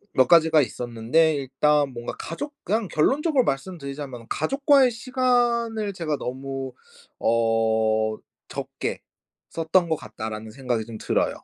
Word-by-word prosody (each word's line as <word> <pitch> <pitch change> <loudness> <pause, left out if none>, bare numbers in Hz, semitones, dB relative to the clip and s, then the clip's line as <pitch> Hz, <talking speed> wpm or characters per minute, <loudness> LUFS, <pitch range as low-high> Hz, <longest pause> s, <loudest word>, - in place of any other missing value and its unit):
몇 130 -1 +5
가지가 160 -1 +6
있었는데 125 +6 +1
일단 145 +1 +1
뭔가 120 -1 -6
가족 290 - -5
그냥 215 +1 0
결론적으로 270 - +2
말씀드리자면은 140 -5 -4
'가족과의 275 -2 +3
시간을 235 -3 +1
제가 160 -5 -2
너무 135 +1 -5 0.5
어 110 -1 +2 0.3
적게 - - -5 0.5
썼던 165 +2 +1
거 160 - +2
같다.'라는 110 -5 -7
생각이 120 -3 -2
좀 110 -1 -8
들어요. - - -1
145 Hz, 295 characters per minute, -24 LUFS, -, 0.5 s, 가지가